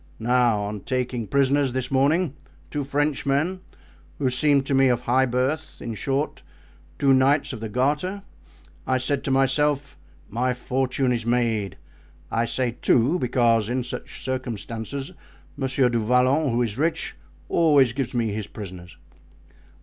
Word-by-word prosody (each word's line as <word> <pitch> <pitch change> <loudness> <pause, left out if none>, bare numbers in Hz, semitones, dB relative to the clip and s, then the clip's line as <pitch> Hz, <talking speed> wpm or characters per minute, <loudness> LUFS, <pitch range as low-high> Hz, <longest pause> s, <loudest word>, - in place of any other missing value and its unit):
Now, 120 -2 +2
on 105 0 -4
taking 125 0 -2
prisoners, 140 0 +2
this 130 0 -3
morning, 145 +4 +2 0.4
two 145 -1 -2
Frenchmen, 145 +4 0 0.6
who 130 -3 0
seemed 140 +1 +3
to 140 - -1
me 135 0 +5
of 120 -1 +1
high 130 +2 +2
birth—in 130 0 -2
short, 135 +8 -2 0.6
two 135 +5 +4
knights 140 +2 +3
of 120 - -6
the 110 0 -5
Garter—I 130 - -3
said 135 +2 0
to - - -1
myself, 140 +1 +1 0.3
my 125 +3 -1
fortune 130 +1 0
is 120 -2 -1
made. 115 -6 0 0.5
I 115 +1 +1
say 120 0 -1
two, 135 +9 +3
because 115 -4 +2
in 125 +1 -1
such 120 - -7
circumstances, 130 - -4 0.4
Monsieur 135 -2 +1
du 120 -1 0
Vallon, 125 +6 +2
who 120 +1 +1
is 110 0 -3
rich, 160 +1 -1 0.3
always 145 -8 +4
gives 130 -1 -3
me 115 -2 +1
his 105 0 -4
prisoners." 90 -5 -9
130 Hz, 140 wpm, -24 LUFS, 120-140 Hz, 0.6 s, me